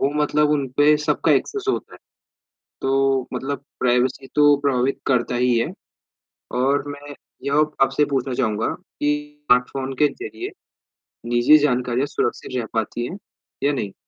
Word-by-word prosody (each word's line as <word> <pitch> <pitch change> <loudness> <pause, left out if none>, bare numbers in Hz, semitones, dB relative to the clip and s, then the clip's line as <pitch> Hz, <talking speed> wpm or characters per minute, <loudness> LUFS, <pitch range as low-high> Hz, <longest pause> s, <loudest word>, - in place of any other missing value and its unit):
वो 140 - +2
मतलब 150 0 +2
उन 145 -2 +1
पे 150 +1 +5
सबका 150 - +1
एक्सेस 410 -1 0
होता 395 - -2
है। - - -14 0.8
तो 135 -1 +1
मतलब 135 +2 -4 0.2
प्राइवेसी 125 +2 +1
तो 145 -1 +6
प्रभावित 135 -1 +1
करता 125 -2 +1
ही 125 -1 +2
है। 115 - 0 0.9
और 140 +2 +1
मैं 145 0 -9 0.3
यह 140 +1 +1 0.2
आपसे 135 +2 +3
पूछना 130 -1 0
चाहूँगा 110 -4 0 0.3
कि 145 - +1 0.4
स्मार्टफ़ोन 130 +1 +1
के 150 - +6
ज़रिए, 385 - -7 0.8
निजी 120 +5 +6
जानकारियाँ 125 0 0
सुरक्षित 130 -2 -2
रह 120 - -2
पाती 115 +1 -2
हैं, 190 - -7 0.5
या 145 - +3
नहीं? 105 -8 -3
135 Hz, 145 wpm, -22 LUFS, 125-145 Hz, 0.9 s, तो